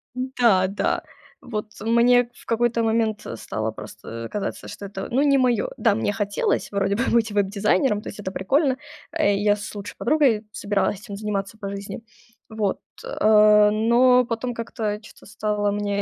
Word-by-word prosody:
Да, 240 -7 +2
да. 195 +2 -1 0.4
Вот 215 -3 -5
мне 235 +2 +4
в - - -17
какой-то 235 0 +1
момент 220 -1 0
стало 110 0 -4
просто, 115 +2 -9
э, - - -7
казаться, 205 - -4
что 200 - -8
это, 195 -1 -6
ну, 265 +4 +2
не 280 -1 +4
моё. 255 - +1
Да, 225 -4 +3
мне 205 -1 -1
хотелось 205 -2 -1
вроде 200 0 0
бы 235 +5 0
быть 230 -2 +2
веб-дизайнером, 205 +2 +1
то - - -6
есть 205 - -10
это 190 -2 -4
прикольно. 260 - +1 0.3
Э, 310 -12 +2
я 205 +1 +2
с 205 0 -8
лучшей 205 -2 -7
подругой 245 -6 +2
собиралась 200 -1 -1
этим 210 -2 -8
заниматься 205 0 -4
по 200 -2 -5
жизни, 200 +2 -6 0.5
вот. 215 -3 -1 0.2
Э, 210 -1 +5
но 240 +4 +4
потом 235 +1 -3
как-то 220 -2 -3
чё-то 225 - -16
стало 210 -1 -1
мне 205 0 -1
210 Hz, 170 wpm, -23 LUFS, 200-235 Hz, 0.5 s, Э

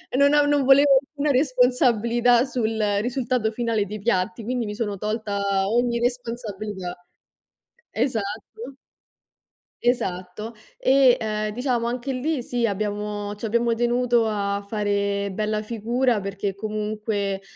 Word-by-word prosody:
no 285 +2 +5
non 290 -1 +3
volevo 275 +2 +6
alcuna 295 +1 -2
responsabilità 245 -3 +3
sul 225 -4 -2 0.2
risultato 245 -2 -1
finale 225 -2 0
dei 210 +2 -6
piatti, 220 +1 -1
quindi 245 0 -1
mi 210 0 -5
sono 205 -2 -3
tolta 210 0 -2 0.3
ogni 235 +1 +1
responsabilità. 215 -6 -4 1.0
E - - -1
esatto. 225 -6 0 1.6
Esatto. 210 -2 -2 0.2
E, 265 -1 +5
ehm, 215 -1 -2
diciamo, 245 -1 -1
anche 250 +3 -3
lì, 265 +1 -1
sì, 240 -1 0
abbiamo 205 0 -3
ci 210 +2 -7
abbiamo 235 +1 +1
tenuto 240 0 +2
a 200 -1 -1
fare 200 -1 -1
bella 215 +1 -1
figura 235 +2 0
perché 195 0 -3
comunque, 210 -1 -3
230 Hz, 120 wpm, -24 LUFS, 210-245 Hz, 1.6 s, volevo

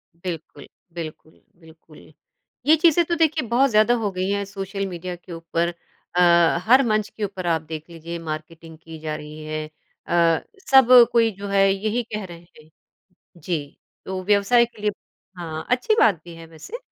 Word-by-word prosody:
बिल्कुल, 165 -4 -8 0.3
बिल्कुल, 160 -1 -9 0.2
बिल्कुल। 160 -1 -18 0.5
ये 315 +2 +6
चीज़ें 335 +1 +4
तो 340 - -1
देखिए 315 -5 +1
बहुत 260 +4 +3
ज़्यादा 215 +2 +4
हो 205 - 0
गई 185 +1 -2
है 200 0 0
सोशल 195 0 -5
मीडिया 180 0 -6
के 175 +1 -15
ऊपर 165 +1 -2 0.4
अ, 170 -2 +5
हर 255 +4 +6
मंच 215 -2 0
के 215 - -7
ऊपर 190 -3 -4
आप 165 -2 +1
देख 160 +1 -8
लीजिए 170 +1 -7
मार्केटिंग 160 0 -8
की 165 0 -11
जा 155 -1 -4
रही 155 +1 -9
है 155 0 -4 0.4
अ, 170 -1 +3 0.3
सब 265 -3 +7 0.2
कोई 230 -1 +3
जो 200 0 -6
है 195 0 +3
यही 215 +4 -2
कह 210 -1 -3
रहे 170 -2 -11 0.2
हैं। 155 +1 -19 0.7
जी, 150 -3 -5 0.3
तो 190 0 -4
व्यवसाय 210 +4 +4
के 225 -3 -17
लिए 210 0 +1 0.5
हाँ, 160 -2 -6
अच्छी 255 - +2
बात 205 -5 +5
भी 170 -1 -11
है 165 0 -11
वैसे। 165 - -9
180 Hz, 175 wpm, -22 LUFS, 165-215 Hz, 0.7 s, सब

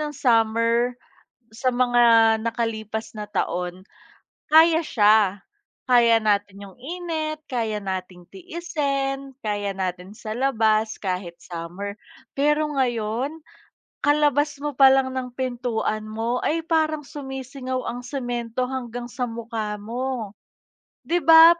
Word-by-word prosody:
ng 300 -1 -3
summer 230 0 +2 0.6
sa 235 +3 -1
mga 240 -2 +5
nakalipas 220 -1 -3
na 210 -1 -7
taon, 180 -2 -2 0.7
kaya 325 +1 +6
siya. 210 -6 +4 0.5
Kaya 235 -2 +5
natin 205 -2 0
'yong 190 - -15
init, 315 0 -4
kaya 225 -5 -1
nating 185 -2 -6
tiisin, 275 - -3
kaya 205 -3 -2
natin 185 -1 -4
sa 215 +1 -6
labas, 220 -4 +1
kahit 180 -3 -4
summer. 180 +4 -6 0.4
Pero 300 +2 +2
ngayon, 245 +3 -1 0.7
kalabas 290 0 +3
mo 295 - -1
palang 265 -1 +6
ng 255 -1 -5
pintuan 240 -4 -2
mo 225 +3 -2
ay 325 +1 0
parang 315 -2 +1
sumisingaw 265 -2 -5
ang 245 +1 -7
semento 245 -2 -3
hanggang 245 -2 -5
sa 250 0 -2
mukha 225 -2 -4
mo. 240 -1 -3 0.7
'Di 350 +1 +1
ba, 325 +2 +8
240 Hz, 115 wpm, -24 LUFS, 215-275 Hz, 0.7 s, ba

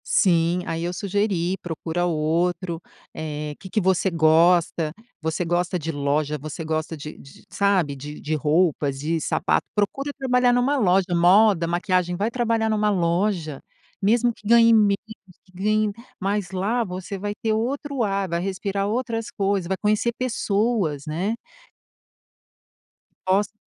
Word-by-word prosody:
Sim, 175 -1 +2
aí 165 0 -3
eu 175 - -1
sugeri, 190 -2 0
procura 170 +1 -3
outro. 170 +2 -1 0.3
Eh, 150 -1 -5
que 190 - -10
que 215 - +1
você 190 0 +2
gosta? 165 0 +3 0.3
Você 160 +2 -2
gosta 175 +2 0
de 165 -1 -3
loja? 145 +1 -1
Você 155 +3 -6
gosta 155 0 -2
de 150 +1 -8
de, 135 - -16
sabe, 190 -8 +1
de 145 +2 -8
de 155 - -3
roupas? 150 -2 +1
De 160 +3 -1
sapato? - - 0
Procura 275 +8 -1
trabalhar 250 -2 +3
numa 250 +4 +2
loja 190 -5 +3
moda, 180 +1 +5
maquiagem, 180 0 0
vai 205 +5 -1
trabalhar 230 -2 0
numa 210 -1 +2
loja. 175 -4 0 0.4
Mesmo 235 +4 +3
que 210 - -13
ganhe 230 0 +6
menos, 205 -3 +4 0.5
que 185 - -24
ganhe 210 +3 +1 0.3
mas, 200 -1 -1
lá 200 +6 0
você 185 0 -6
vai 205 +1 -3
ter 220 -1 0
outro 270 +4 -2
ar, 195 -2 0
vai 170 -1 -1
respirar 195 +1 -2
outras 230 0 -2
coisas, 195 -3 -1
vai 190 +1 -1
conhecer 215 +3 +1
pessoas, 210 - 0
né. 180 +9 -2 1.9
Posta. 200 +3 +1
185 Hz, 145 wpm, -23 LUFS, 165-210 Hz, 1.9 s, ganhe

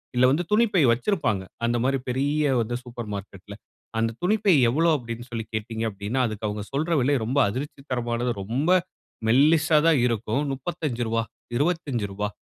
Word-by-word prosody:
இல்ல 125 - +5
வந்து 165 +5 +1
துணிப்பை 210 -5 +3
வைச்சிருப்பாங்க. 115 - 0 0.2
அந்த 120 0 +1
மாதிரி 135 0 +1
பெரிய 145 +3 +1
வந்து 120 +2 -2
சூப்பர் 120 -3 -7
மார்க்கெட்‌ல 100 0 -9 0.4
அந்த 115 0 +1
துணிப்பை 205 0 +3 0.2
எவ்வளவு 160 +6 +3
அப்டீன்னு 120 -1 -7
சொல்லி 115 -1 -3
கேட்டீர்கள் 110 +1 -2
அப்டீன்னா, 100 +5 -3
அதற்கு 110 -1 -4
அவங்க 105 0 -4
சொல்லுற 160 +5 0
விலை 135 +4 +2
ரொம்ப 135 +5 +1
அதிர்ச்சி 135 +4 -5
தரமானது. 120 0 -1
ரொம்ப 135 - 0 0.6
மெல்லிசா 155 +5 +4
தான் 155 -5 +5
இருக்கும். 115 +2 0
ரூ.35 125 -6 -2 0.3
ரூ.25 120 - -1
125 Hz, 145 wpm, -25 LUFS, 115-150 Hz, 0.6 s, இல்ல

